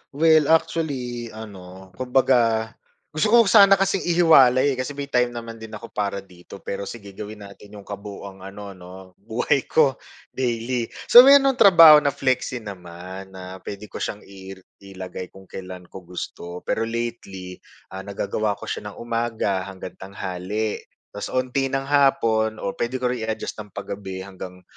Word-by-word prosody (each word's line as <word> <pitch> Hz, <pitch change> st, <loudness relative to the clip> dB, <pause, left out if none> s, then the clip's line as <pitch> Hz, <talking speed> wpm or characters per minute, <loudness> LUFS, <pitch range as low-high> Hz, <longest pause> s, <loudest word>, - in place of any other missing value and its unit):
Well 155 Hz, -1 st, +4 dB
actually, 145 Hz, -8 st, 0 dB
ano, 95 Hz, -3 st, -11 dB
kumbaga, 120 Hz, -3 st, +2 dB, 0.4 s
gusto 155 Hz, +8 st, +1 dB
ko 235 Hz, +2 st, +6 dB
sana 195 Hz, -1 st, +7 dB
kasing 195 Hz, -1 st, 0 dB
ihiwalay 145 Hz, -6 st, +5 dB
kasi 140 Hz, +3 st, -4 dB
may 140 Hz, -1 st, -6 dB
time 125 Hz, -1 st, +1 dB
naman 115 Hz, -1 st, -7 dB
din 110 Hz, -1 st, -10 dB
ako 115 Hz, -, -10 dB
para 100 Hz, -1 st, -3 dB
dito 90 Hz, 0 st, -14 dB
pero 100 Hz, 0 st, -5 dB
sige, 100 Hz, -4 st, -9 dB
gawin 105 Hz, +1 st, -9 dB
natin 100 Hz, +1 st, -13 dB
yung 100 Hz, -, -10 dB
kabuuang 100 Hz, -1 st, -9 dB
ano 100 Hz, +1 st, -9 dB
'no 90 Hz, -1 st, -13 dB, 0.3 s
buhay 120 Hz, +6 st, -1 dB
ko 140 Hz, -4 st, +2 dB, 0.3 s
daily. 120 Hz, -1 st, -2 dB, 0.2 s
So, 245 Hz, +3 st, +11 dB
mayroon 275 Hz, -1 st, +7 dB
akong 250 Hz, -, -11 dB
trabaho 165 Hz, -7 st, +9 dB
na 140 Hz, -2 st, -1 dB
flexi 130 Hz, -3 st, -1 dB
naman, 95 Hz, 0 st, -9 dB
na 95 Hz, 0 st, -9 dB
pwede 105 Hz, +1 st, -9 dB
ko -, -, -7 dB
siyang 105 Hz, -, -4 dB
i 95 Hz, 0 st, -11 dB, 0.2 s
ilagay 95 Hz, -2 st, -8 dB
kung 95 Hz, +2 st, -16 dB
kailan 90 Hz, -1 st, -9 dB
ko 95 Hz, -, -8 dB
gusto 90 Hz, 0 st, -7 dB
pero 115 Hz, +1 st, -1 dB
lately, 115 Hz, -6 st, -5 dB, 0.3 s
ah, 95 Hz, -, -6 dB
nagagawa 100 Hz, +1 st, -2 dB
ko -, -, -14 dB
siya 105 Hz, -, -5 dB
ng 105 Hz, -, -9 dB
umaga 115 Hz, -5 st, -1 dB
hanggang 95 Hz, -1 st, -9 dB
tanghali. 95 Hz, +2 st, -4 dB, 0.3 s
Tapos 100 Hz, -, -6 dB
unti 130 Hz, +1 st, 0 dB
ng 135 Hz, 0 st, -2 dB
hapon 115 Hz, -6 st, +2 dB
o 100 Hz, -, -1 dB
pwede 120 Hz, +2 st, -2 dB
ko 125 Hz, -1 st, 0 dB
rin 110 Hz, -3 st, -4 dB
i-adjust 110 Hz, 0 st, -4 dB
ng 105 Hz, -2 st, -10 dB
pa-gabi 95 Hz, -1 st, -6 dB
hanggang 90 Hz, -1 st, -10 dB
110 Hz, 160 wpm, -23 LUFS, 95-130 Hz, 0.4 s, So